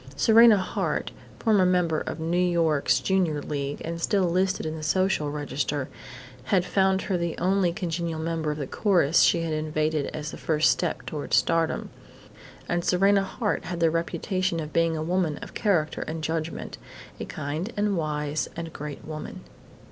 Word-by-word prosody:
Serena 225 +7 +7
Hart, 185 - -2 0.3
former 215 -5 +3
member 180 -3 +2
of - - -5
New 160 +1 -2
York's 170 -5 +2
Junior 180 -6 +1
League 140 -1 -4
and 170 +1 -4
still 195 +2 +2
listed 185 +1 +1
in 155 0 -3
the 160 - -7
Social 185 -1 +1
Register, 145 -1 -3 0.6
had 185 +4 +2
found 190 0 +2
her 185 -3 -1
the 170 -1 -2
only 185 -1 +2
congenial 170 -2 -3
member 160 -1 -2
of 150 - -2
the 145 - -3
chorus 175 -1 +3
she 170 - +4
had 165 -1 -2
invaded 155 -1 -1
as 150 0 -5
the - - -8
first 155 -1 +3
step 175 -3 -2
toward 150 -2 -2
stardom. 165 -1 +1 0.8
And 175 0 0
Serena 195 +3 +3
Hart 205 +2 -2
had 175 -2 -4
the 165 -1 +3
reputation 175 +1 -1
of 155 -1 -6
being 165 -1 +2
a 155 - -2
woman 170 -3 0
of - - -9
character 170 -8 0
and 160 0 -4
judgment, 160 0 -3 0.4
a - - -4
kind 155 +9 -4
and 205 -1 +1
wise 150 -2 -2
and 165 -1 -6
great 150 -1 -7
woman.... 155 -1 -7
165 Hz, 170 wpm, -26 LUFS, 155-185 Hz, 0.8 s, Serena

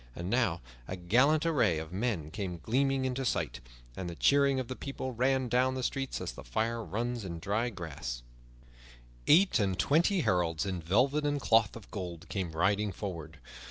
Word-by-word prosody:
And 85 +3 -4
now 115 -9 +1 0.3
a 95 - -4
gallant 125 - +3
array 145 - +3
of 80 +2 -6
men 95 -7 -2
came 95 -3 -4
gleaming 135 - +1
into 130 +1 -1
sight, 125 - -1 0.4
and 90 -2 -4
the 85 - -6
cheering 140 +5 +4
of 130 - -3
the 130 - -5
people 135 -1 -5
ran 130 +2 +1
down 130 +2 +2
the 130 - -3
crowd 135 -1 -3
as - - -4
the - - -10
fire 115 - -1
runs 120 +2 -3
in 85 -3 -5
dry 105 +8 -1
grass. 70 - -6 1.0
Eight 185 -1 +6
and 95 -3 +1
twenty 170 - +3
heralds 90 - +1
in 95 -3 -3
velvet 125 - +2
and 145 0 0
cloth 115 -5 +3
of 115 - -12
gold 85 -4 -6
came 95 -5 -3
riding 100 +5 +1
forward. 85 -5 -6
110 Hz, 180 wpm, -31 LUFS, 90-130 Hz, 1.0 s, Eight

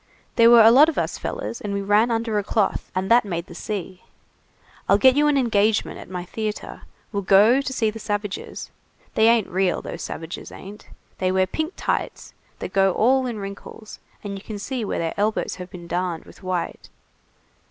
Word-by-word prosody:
There 230 -1 +6
were 235 -1 +8
a 225 - +8
lot 290 +6 +7
of 320 - -5
us - - -2
fellers, - - -5
and 200 -1 -3
we 200 - -1
ran 210 +4 +3
under 225 -2 0
a - - -3
cloth, 205 0 -1
and 185 +3 -1
that 240 +1 +6
made 170 -4 -4
the 175 - -12
sea. 185 0 -6 0.9
I'll 200 - +6
get 260 +4 +5
you 295 +1 +3
an 295 -1 +3
engagement 220 -4 +1
at - - -11
my 180 -1 -5
theatre. 215 +3 -5 0.3
We'll 200 - -2
go 205 +7 +5
to 275 - -4
see 225 -4 0
the 225 - -9
savages. 205 -2 -4 0.4
They 220 - +4
ain't 230 -3 +4
real, 185 0 0
those - - -7
savages 165 +1 -7
ain't. 205 +2 -11 0.3
They 185 0 +1
wear 190 0 +2
pink 315 - -3
tights - - -3 0.2
that - - -7
go 195 -1 +3
all 255 +5 +3
in 235 -3 -4
wrinkles, 200 +2 -9 0.2
and 205 -1 -5
you - - -17
can 215 - -6
see 245 +4 -4
where 205 - -2
their 165 -1 -2
elbows 210 -1 -1
have 180 -1 -8
been 175 -3 -10
darned 175 -1 -3
with - - -16
white. 185 -2 -4
210 Hz, 200 wpm, -23 LUFS, 190-230 Hz, 0.9 s, were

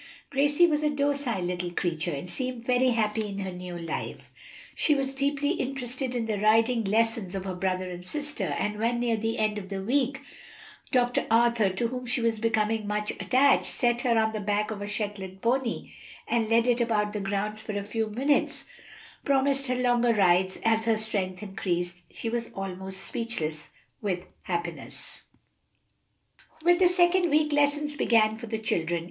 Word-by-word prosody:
Gracie 290 +5 +4
was 305 -3 +1
a 300 - +2
docile 280 -8 0
little 175 0 -2
creature, 175 -1 -1
and 145 +4 -5
seemed 250 +3 -4
very 255 +1 +3
happy 220 -2 0
in 200 -1 -6
her 190 -2 -3
new 180 -1 -7
life. 165 -2 -5 0.4
She 300 - +3
was 270 -1 -1
deeply 280 +2 0
interested 260 -4 -3
in 235 -2 -1
the 215 -2 -2
riding 225 +3 +3
lessons 220 -2 +1
of 190 -1 -4
her 190 - -3
brother 185 0 -1
and 180 0 -7
sister, 295 +9 -4
and 210 0 -2
when, 235 +2 +1
near 240 -1 +1
the 225 +1 -2
end 215 -1 0
of 190 -2 -10
the 195 -1 -4
week, 270 +4 +1 0.7
Dr. 245 -2 +2
Arthur, 230 -2 +4
to 210 +5 -1
whom 250 0 -5
she 240 - +1
was 230 -2 0
becoming 220 -1 +1
much 210 0 -1
attached, 275 +2 +3
set 240 -1 +1
her 240 -3 +2
on 220 0 +2
the 215 - -2
back 210 +1 0
of 205 -2 -5
a 205 - -4
Shetland 205 -3 -4
pony 240 0 0 0.4
and 230 -2 +1
led 230 +1 +4
it 245 -1 +2
about 210 -3 +1
the 210 - -2
grounds 205 +2 -2
for 210 -2 -4
a 200 - -2
few 220 +2 -2
minutes, 275 +7 0 0.6
promising 275 -1 +1
her - - -1
longer 240 -1 +3
rides 185 -1 +3
as 225 0 +3
her 225 -1 +3
strength 200 -4 -3
increased, 175 -3 -3
she - - -6
was 235 0 -2
almost 190 0 -5
speechless 160 -10 -3 0.3
with 185 -4 -2 0.2
happiness. 170 -2 -5 1.4
With 350 0 +5
the 370 - +6
second 355 0 +3
week 305 0 +3
lessons 290 +1 +1
began 220 -4 +3
for 230 - -8
the 220 0 -2
children. 170 -6 -1
225 Hz, 175 wpm, -27 LUFS, 195-255 Hz, 1.4 s, the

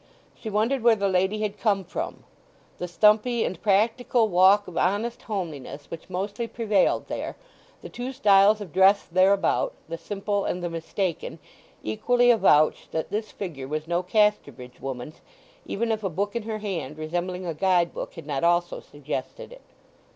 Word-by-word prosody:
She 220 - -8
wondered 225 +6 +1
where 230 0 +5
the 200 -2 0
lady 190 +3 +1
had 210 -1 -3
come 200 -4 +1
from. 175 - -5 0.6
The 180 - -3
stumpy 215 +6 +3
and 185 - -5
practical 225 +3 +2
walk 190 +3 +5
of 180 - -10
honest 205 +7 0
homeliness 150 - -6
which 165 +3 -8
mostly 200 +5 -3
prevailed 215 -4 +1
there, - - -4 0.5
the - - -6
two 245 +2 -5
styles 210 -5 +4
of 185 -7 -8
dress 195 +2 +5
thereabout, 195 - +2
the 165 0 -6
simple 205 +1 -2
and 180 - -3
the 175 - -3
mistaken, 165 +1 -3 0.5
equally 245 - +3
avouched 155 -9 +3
that 160 - -3
this 215 +1 -3
figure 150 -9 -6
was 155 +2 -4
no 175 +1 0
Casterbridge 180 - 0
woman's, 135 +2 -6 0.5
even 230 +3 -1
if 220 -1 -2
a 195 - 0
book 200 +6 -3
in 235 - -1
her 215 - -2
hand 180 -9 -5
resembling 175 +4 -3
a 170 - -2
guide 175 +1 +2
book - - -6
had 165 - -9
not 145 -1 -3
also 175 0 +2
suggested 145 - -7
it. - - -13
195 Hz, 165 wpm, -25 LUFS, 170-215 Hz, 0.6 s, where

